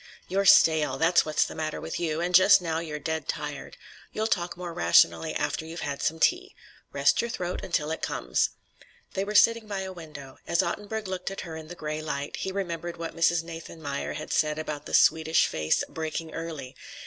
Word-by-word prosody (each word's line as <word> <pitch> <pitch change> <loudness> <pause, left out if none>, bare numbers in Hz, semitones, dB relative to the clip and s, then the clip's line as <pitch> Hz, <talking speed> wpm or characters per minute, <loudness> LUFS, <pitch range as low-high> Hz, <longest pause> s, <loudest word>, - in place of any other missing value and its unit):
"You're 195 +2 0
stale; 155 -6 +6
that's 165 +4 +4
what's 155 -1 +2
the - - -7
matter 155 -1 -3
with 160 - -5
you. 165 -2 -1
And 180 +1 -1
just 190 +3 +8
now 165 -3 -2
you're 155 -3 -5
dead 160 +2 -3
tired. - - -5 0.3
You'll 215 - -2
talk 175 -5 -1
more 175 -1 -6
rationally 160 -1 +3
after - - -1
you've 165 +2 -7
had 140 -1 -4
some 160 +1 -1
tea. 370 - +1 0.4
Rest - - +3
your 235 - -3
throat 180 -5 -4
until 155 -3 -1
it 160 - -4
comes." - - 0 0.6
They 195 - -1
were 210 +1 -5
sitting 230 +1 +5
by 200 -2 -3
a 190 0 -5
window. 150 -6 -11
As 170 - +2
Ottenburg 210 +4 -4
looked 185 -1 -3
at 195 - -6
her 165 -3 -7
in 160 -1 -8
the 175 - -8
gray 155 -1 -4
light, 145 -2 -4
he 190 - -3
remembered 175 -3 -4
what 165 0 -6
Mrs. 165 0 +2
Nathanmeyer 165 -3 -6
had - - -5
said 155 -1 +1
about 150 -2 -5
the - - 0
Swedish 160 0 +4
face 80 0 0
"breaking 160 0 -5
early." 160 -6 -6
165 Hz, 200 wpm, -27 LUFS, 155-180 Hz, 0.6 s, just